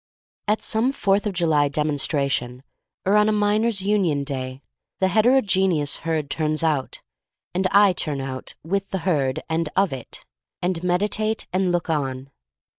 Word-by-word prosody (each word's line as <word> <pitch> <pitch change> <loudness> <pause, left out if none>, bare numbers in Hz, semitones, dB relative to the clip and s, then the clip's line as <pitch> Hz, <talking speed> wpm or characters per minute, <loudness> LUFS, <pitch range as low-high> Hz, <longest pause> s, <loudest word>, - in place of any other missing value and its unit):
At 210 +1 +1
some 230 +4 +3
Fourth 205 -5 +1
of 205 - -2
July 160 -5 +2
demonstra 145 -1 0
tion, 125 0 -3 0.4
or 195 +2 +3
on 210 0 +4
a - - +3
Miners' 210 0 +1
Union 190 -8 +1
day, 130 -1 -5 0.4
the 190 - +2
heterogeneous 190 - +2
herd 160 -2 -2
turns 155 +1 -1
out 150 -5 -1 0.2
— - - -66
and 185 +1 +1
I 200 0 +5
turn 150 -5 -3
out, 130 -1 -6
with 195 +4 -2
the 190 - -2
herd 140 -8 0
and 160 0 -1
of 195 -7 +2
it, 130 -3 -7 0.3
and 175 -1 -1
meditate 210 +5 0
and 185 -1 +1
look 175 -1 -1
on. 135 -4 -2
175 Hz, 160 wpm, -23 LUFS, 145-200 Hz, 0.4 s, I